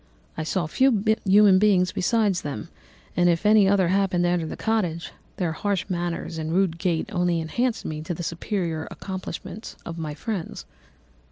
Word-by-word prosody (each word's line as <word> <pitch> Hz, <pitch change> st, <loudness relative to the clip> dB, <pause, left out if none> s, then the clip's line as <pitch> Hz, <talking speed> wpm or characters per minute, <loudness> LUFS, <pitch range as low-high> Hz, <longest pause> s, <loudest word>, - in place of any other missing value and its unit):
I -, -, -3 dB
saw 170 Hz, +2 st, -1 dB
few 225 Hz, -, +2 dB, 0.2 s
human 195 Hz, -1 st, +6 dB
beings 190 Hz, -3 st, +3 dB
besides 205 Hz, -1 st, +1 dB
them, 140 Hz, -8 st, -5 dB, 0.5 s
and 175 Hz, 0 st, +4 dB
if 170 Hz, +3 st, 0 dB
any 210 Hz, -2 st, +6 dB
other 190 Hz, -3 st, +3 dB
happened 190 Hz, -2 st, +2 dB
to 175 Hz, -, +2 dB
enter 170 Hz, -2 st, 0 dB
the -, -, -6 dB
cottage, 180 Hz, -7 st, -1 dB, 0.3 s
their 175 Hz, -3 st, 0 dB
harsh 195 Hz, +3 st, -1 dB
manners 175 Hz, -2 st, -3 dB
and 155 Hz, 0 st, -3 dB
rude 175 Hz, -2 st, +1 dB
gait 175 Hz, +1 st, 0 dB
only 175 Hz, -2 st, +1 dB
enhanced 235 Hz, +9 st, -1 dB
to -, -, -5 dB
me 155 Hz, -1 st, -4 dB
the 175 Hz, +2 st, -4 dB
superior 165 Hz, -1 st, -3 dB
accomplishments 190 Hz, +2 st, -7 dB
of 165 Hz, 0 st, -6 dB
my 155 Hz, -2 st, -4 dB
friends. 195 Hz, +1 st, -5 dB
180 Hz, 170 wpm, -24 LUFS, 165-200 Hz, 0.5 s, human